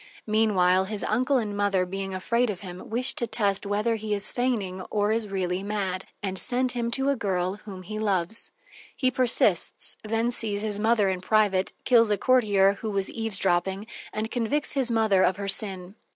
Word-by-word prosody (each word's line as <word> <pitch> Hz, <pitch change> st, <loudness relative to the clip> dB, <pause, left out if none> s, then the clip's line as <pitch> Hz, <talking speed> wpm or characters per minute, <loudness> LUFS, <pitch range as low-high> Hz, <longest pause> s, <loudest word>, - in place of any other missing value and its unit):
Meanwhile, 190 Hz, -4 st, +3 dB
his 205 Hz, -1 st, -3 dB
uncle 255 Hz, +5 st, +1 dB
and 210 Hz, -4 st, -2 dB
mother, 200 Hz, -2 st, +1 dB
being 195 Hz, +1 st, -5 dB
afraid 235 Hz, +6 st, 0 dB
of 190 Hz, -4 st, -4 dB
him, 180 Hz, -2 st, -9 dB
wish 250 Hz, +4 st, +1 dB
to 235 Hz, -, -2 dB
test 200 Hz, -2 st, 0 dB
whether 210 Hz, +3 st, 0 dB
he 215 Hz, -1 st, -2 dB
is 200 Hz, 0 st, 0 dB
feigning 215 Hz, -7 st, -1 dB
or 205 Hz, 0 st, +1 dB
is 220 Hz, -1 st, +1 dB
really 185 Hz, -1 st, -2 dB
mad, 195 Hz, -2 st, -3 dB, 0.2 s
and 190 Hz, -1 st, -1 dB
send 255 Hz, 0 st, +1 dB
to 245 Hz, -, -4 dB
him 270 Hz, +2 st, +2 dB
a 280 Hz, -, +2 dB
girl 190 Hz, -4 st, -1 dB
whom 190 Hz, -3 st, -8 dB
he 215 Hz, +4 st, -6 dB
loves. 200 Hz, 0 st, 0 dB, 0.5 s
He 255 Hz, -1 st, +1 dB
persists, 235 Hz, -8 st, +1 dB
then 225 Hz, +2 st, 0 dB
sees 210 Hz, -4 st, -2 dB
his 210 Hz, -2 st, -2 dB
mother 215 Hz, -3 st, +2 dB
in 185 Hz, -1 st, -4 dB
private, 200 Hz, -2 st, +2 dB
kills 230 Hz, -3 st, +5 dB
a 205 Hz, -, +2 dB
courtier 205 Hz, -6 st, +3 dB
who 220 Hz, -, -3 dB
was 195 Hz, -2 st, -1 dB
eavesdropping, 195 Hz, -3 st, 0 dB, 0.3 s
and 220 Hz, +1 st, -4 dB
convicts 255 Hz, +5 st, 0 dB
his 265 Hz, -4 st, 0 dB
mother 220 Hz, -4 st, +3 dB
of 185 Hz, 0 st, +2 dB
her 200 Hz, -1 st, -4 dB
sin. 195 Hz, -2 st, +1 dB
210 Hz, 185 wpm, -26 LUFS, 190-230 Hz, 0.5 s, kills